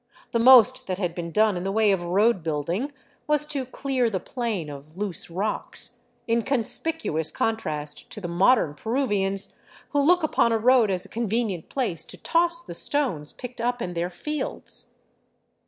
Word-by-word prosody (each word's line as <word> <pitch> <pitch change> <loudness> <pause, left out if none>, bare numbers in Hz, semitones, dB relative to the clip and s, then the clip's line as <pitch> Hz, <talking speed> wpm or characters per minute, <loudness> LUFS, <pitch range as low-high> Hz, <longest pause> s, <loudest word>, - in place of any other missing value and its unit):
The 235 - +1
most 245 -2 +7
that 185 -1 -2
had 180 -4 -2
been 170 -1 -5
done 215 +3 +3
in 175 - -3
the 195 - -1
way 215 0 +3
of 190 -3 +1
road 195 +4 +2
building 165 - -2 0.4
was 300 0 +4
to 275 -4 -3
clear 260 -2 0
the 190 -4 -2
plain 220 - -3
of 145 +3 -10
loose 200 -4 -3
rocks 195 +5 -2
— - - -41
in 230 0 +2
conspicuous 255 - -1
contrast 150 -10 -2
to - - -6
the 185 - -5
modern 175 - +3
Peruvians, 205 - -1 0.3
who 285 - +2
look 350 +4 +4
upon 235 -6 +2
a 225 - +3
road 240 -1 +4
as 185 -2 0
a - - -14
convenient 220 -6 -2
place 235 - -1
to - - -9
toss 340 0 +1
the - - -8
stones 170 - -1
picked 250 -2 -8
up 245 +1 0
in 180 -6 -4
their 170 +1 -2
fields. 300 +12 -5
215 Hz, 175 wpm, -25 LUFS, 175-255 Hz, 0.4 s, most